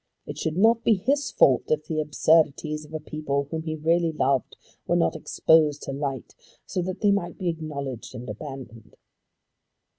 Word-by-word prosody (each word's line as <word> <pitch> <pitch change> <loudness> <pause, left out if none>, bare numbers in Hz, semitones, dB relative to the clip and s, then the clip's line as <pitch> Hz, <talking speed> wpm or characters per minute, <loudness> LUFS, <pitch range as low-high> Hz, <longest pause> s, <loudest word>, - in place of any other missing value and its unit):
It - - -7
should 160 +1 -2
not 225 +3 +4
be 225 - +4
his 280 +9 0
fault 130 -3 +4
if 155 0 0
the 155 -1 -2
absurdities 150 0 +2
of 150 - -16
a - - -2
people 150 -2 -2
whom 160 -1 -2
he 160 -1 -4
really 165 +2 +1
loved 135 -4 0 0.3
were - - +2
not 80 - +2
exposed 155 -2 +2
to - - -4
light, 135 -2 -4 0.3
so 185 - -2
that 185 +2 -5
they 205 -2 +4
might 200 -4 -1
be 180 -2 -1
acknowledged 140 -7 -5
and 125 +1 -8
abandoned. 115 -1 -9
155 Hz, 175 wpm, -25 LUFS, 140-170 Hz, 0.3 s, not